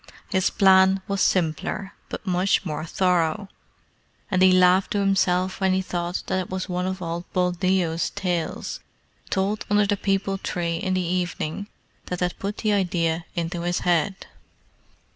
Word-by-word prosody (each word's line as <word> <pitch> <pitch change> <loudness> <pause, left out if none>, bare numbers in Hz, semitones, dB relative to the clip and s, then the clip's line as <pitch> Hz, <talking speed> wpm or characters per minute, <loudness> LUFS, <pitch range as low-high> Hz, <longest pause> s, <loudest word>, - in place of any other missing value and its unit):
His 190 0 +2
plan 190 -2 +5
was 200 -1 -1
simpler, 185 +3 0 0.2
but - - -6
much 185 +1 +1
more 155 -1 -3
thorough; 180 +2 +1 0.8
and 185 -1 +2
he 185 0 +7
laughed 185 +1 +5
to 205 - +1
himself 190 -1 +1
when 190 -1 +3
he 190 - +1
thought 175 0 -3
that 190 - 0
it 185 - -4
was 185 0 -3
one 180 0 -2
of 190 -1 -4
old 170 +1 -5
Buldeo's 180 -2 +1
tales 180 -4 -3 0.5
told 200 +2 0
under 205 0 +4
the 205 0 0
peepul 195 0 0
tree 170 -3 -2
in 185 +2 -1
the 185 -1 0
evening 180 +1 -2 0.4
that 180 - -3
had 180 0 -1
put 200 +2 -4
the 215 -1 +1
idea 170 -4 0
into 170 +1 -2
his 175 +1 -1
head. 175 +2 0
185 Hz, 160 wpm, -24 LUFS, 175-195 Hz, 0.8 s, he